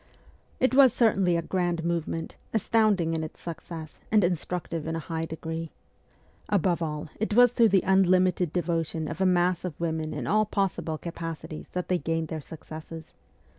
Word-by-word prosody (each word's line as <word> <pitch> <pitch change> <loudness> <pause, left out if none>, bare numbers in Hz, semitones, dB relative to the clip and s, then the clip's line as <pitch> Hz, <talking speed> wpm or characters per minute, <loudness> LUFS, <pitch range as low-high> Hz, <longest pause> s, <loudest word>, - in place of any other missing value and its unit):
It 260 0 +2
was 265 -2 +7
certainly 195 -7 +3
a 170 - -2
grand 175 -2 -1
movement, 165 -1 -2 0.2
astounding 210 -6 +2
in 160 -1 -1
its 155 - -8
success 165 -2 -8
and 210 -2 +5
instructive 170 -1 -2
in 160 - -2
a - - -2
high 165 -1 -2
degree. 160 0 -5 0.8
Above 180 -3 +2
all 150 -1 -3
it 215 0 -1
was 245 0 +7
through 235 -2 +4
the 190 -2 +3
unlimited 185 -2 +3
devotion 165 -2 -1
of 175 - -5
a 190 - +4
mass 180 -1 +2
of 180 -5 -5
women 160 -2 -2
in - - -4
all 215 +1 +3
possible 195 -6 -1
capacities 165 -1 -6
that 180 0 -2
they 180 -1 +1
gained 165 -1 -2
their 160 -1 -4
successes. 160 +1 -10
170 Hz, 170 wpm, -27 LUFS, 160-190 Hz, 0.8 s, was